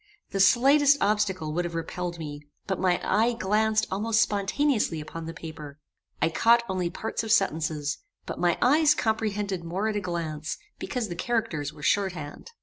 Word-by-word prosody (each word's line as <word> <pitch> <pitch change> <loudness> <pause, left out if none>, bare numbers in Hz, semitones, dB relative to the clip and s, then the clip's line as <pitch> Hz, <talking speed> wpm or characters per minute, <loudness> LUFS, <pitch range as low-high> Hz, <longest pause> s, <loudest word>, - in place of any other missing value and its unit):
The 195 - -2
slightest 275 +8 +5
obstacle 190 -7 0
would 175 +2 0
have 170 -1 -5
repelled 175 +1 -4
me; 150 -2 -7 0.2
but 190 -1 -2
my 180 -1 +2
eye 230 +3 +2
glanced 220 0 +1
almost 220 +3 +1
spontaneously 210 - +1
upon 160 +2 -7
the - - -4
paper. 155 -3 -9 0.4
I 160 - +2
caught 235 +8 +4
only 185 -2 -1
parts 220 +5 -4
of 220 - -3
sentences; 155 -7 +1 0.3
but - - -6
my 175 -1 +2
eyes 300 +3 +5
comprehended 210 -6 -1
more 190 +6 -2
at 215 - -3
a 205 - 0
glance, 160 -4 -4 0.2
because 250 -5 -3
the 175 - -4
characters 170 -8 -1
were 150 -1 -13
short 195 +1 +2
hand. 155 - -8
190 Hz, 170 wpm, -27 LUFS, 165-220 Hz, 0.4 s, slightest